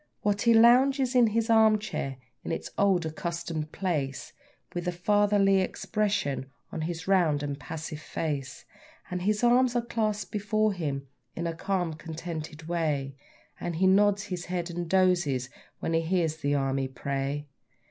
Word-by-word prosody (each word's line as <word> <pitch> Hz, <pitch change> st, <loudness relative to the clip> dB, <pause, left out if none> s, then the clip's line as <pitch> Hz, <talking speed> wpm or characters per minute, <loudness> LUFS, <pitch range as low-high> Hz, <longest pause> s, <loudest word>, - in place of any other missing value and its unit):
Watty 205 Hz, +3 st, +2 dB
lounges 255 Hz, +3 st, +5 dB
in 245 Hz, -2 st, +6 dB
his 225 Hz, +1 st, 0 dB
arm 220 Hz, -2 st, +5 dB
chair, 135 Hz, -10 st, -4 dB, 0.3 s
in -, -, -4 dB
its -, -, -4 dB
old 190 Hz, -4 st, +2 dB
accustomed 165 Hz, -1 st, -4 dB
place, 150 Hz, -8 st, -2 dB, 0.4 s
With 175 Hz, 0 st, -3 dB
a -, -, +2 dB
fatherly 195 Hz, +1 st, +3 dB
expression 185 Hz, -, -1 dB, 0.2 s
on 160 Hz, -, -4 dB
his 165 Hz, +1 st, -4 dB
round 170 Hz, -7 st, +3 dB
and 145 Hz, -1 st, -3 dB
passive 160 Hz, 0 st, -6 dB
face; 145 Hz, -4 st, -4 dB, 0.5 s
And 180 Hz, 0 st, -2 dB
his 210 Hz, +4 st, 0 dB
arms 245 Hz, +1 st, +4 dB
are 240 Hz, -1 st, +1 dB
clasped 215 Hz, -3 st, -1 dB
before 215 Hz, 0 st, +1 dB
him 140 Hz, -6 st, -3 dB, 0.3 s
in 170 Hz, -, -3 dB
a 165 Hz, -, -1 dB
calm, 175 Hz, -1 st, -1 dB
contented 160 Hz, -1 st, -7 dB
way, 150 Hz, -5 st, -1 dB, 0.4 s
And 175 Hz, -, -3 dB
he 185 Hz, +4 st, +2 dB
nods 200 Hz, +1 st, +4 dB
his 180 Hz, -4 st, -5 dB
head 175 Hz, -1 st, -3 dB
and 170 Hz, -1 st, -4 dB
dozes 175 Hz, -9 st, +2 dB, 0.3 s
when 165 Hz, -, -1 dB
he 165 Hz, -, +3 dB
hears 165 Hz, -2 st, 0 dB
the 145 Hz, -2 st, 0 dB
Army 135 Hz, -1 st, 0 dB
pray. 140 Hz, +2 st, -3 dB
175 Hz, 155 wpm, -28 LUFS, 155-205 Hz, 0.5 s, in